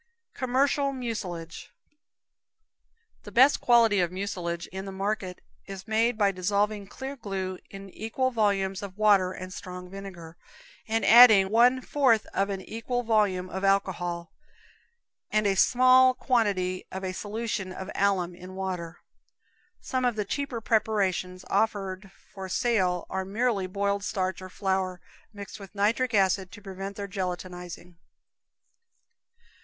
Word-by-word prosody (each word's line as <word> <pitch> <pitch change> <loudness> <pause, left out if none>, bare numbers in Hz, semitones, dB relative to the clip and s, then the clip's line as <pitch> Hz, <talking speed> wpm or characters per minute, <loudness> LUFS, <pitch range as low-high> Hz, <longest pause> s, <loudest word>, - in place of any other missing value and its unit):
Commercial 275 +2 +1
Mucilage. 195 -10 -5 1.5
The 205 - -11
best 260 +7 +5
quality 230 -4 +4
of 175 -1 +1
mucilage 180 -3 -4
in 190 +1 -6
the 195 - -6
market 195 -1 -3 0.3
is 195 0 -8
made 225 +2 +1
by 200 -2 +3
dissolving 200 +2 -1
clear 265 +6 -7
glue 190 -6 -4
in 195 0 -10
equal 255 +6 -2
volumes 200 -4 0
of 200 -1 -8
water 200 -4 +4
and 185 0 -8
strong 180 -2 -8
vinegar, 180 -4 -9 0.5
and 225 +1 0
adding 220 -5 +8
one 245 +3 +4
fourth 255 -6 +2
of 195 +1 0
an 195 -1 -3
equal 240 +4 -3
volume 205 -5 +1
of 190 +1 -6
alcohol, 175 -3 0 1.0
and 215 0 +1
a 200 - +3
small 255 +4 +5
quantity 200 -9 0
of 190 0 -6
a 185 -1 -3
solution 210 -1 -4
of 190 +2 -7
alum 190 -3 +1
in 180 +2 -11
water. 180 -3 -5 0.8
Some 255 -1 -2
of 245 -2 +1
the 210 -1 -2
cheaper 265 0 -3
preparations 190 -5 0
offered 195 -3 -1 0.2
for 190 -1 -7
sale 185 -6 +1
are 190 0 -3
merely 205 0 -1
boiled 200 +1 -1
starch 185 -2 -2
or 185 - -8
flour, 190 -1 -2 0.3
mixed 205 0 -9
with 195 0 -12
nitric 225 +4 +1
acid 190 -1 +2
to 205 - -11
prevent 195 0 -6
their 200 0 -5
gelatinizing. 180 -2 -6
195 Hz, 135 wpm, -27 LUFS, 185-220 Hz, 1.5 s, adding